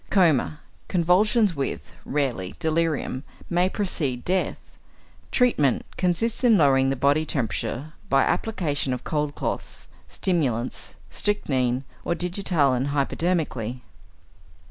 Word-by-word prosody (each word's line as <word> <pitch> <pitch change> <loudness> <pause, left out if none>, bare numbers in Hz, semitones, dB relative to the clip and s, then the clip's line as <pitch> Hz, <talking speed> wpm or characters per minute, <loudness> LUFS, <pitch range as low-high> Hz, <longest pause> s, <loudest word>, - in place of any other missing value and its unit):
Coma, 160 -6 +3 0.3
convulsions 190 +3 +3
with 140 -1 -4
(rarely) 130 -11 -1
delirium, 160 -4 0 0.3
may 175 +2 +3
precede 145 - -2
death. 185 +1 -2 0.5
Treatment 150 - +2
consists 200 +7 0
in 230 -4 +6
lowering 135 -4 +4
the 135 - +1
body 140 +4 +3
temperature 140 +1 -3 0.2
by 135 0 +4
application 150 -11 0
of 125 - -5
cold 150 -2 -1
cloths, - - -4 0.2
stimulants, 130 -10 -1 0.2
strychnine 130 -11 0 0.2
or 170 - 0
digitalin 165 -7 +1
hypodermically. 140 -4 -1
150 Hz, 100 wpm, -25 LUFS, 135-180 Hz, 0.5 s, in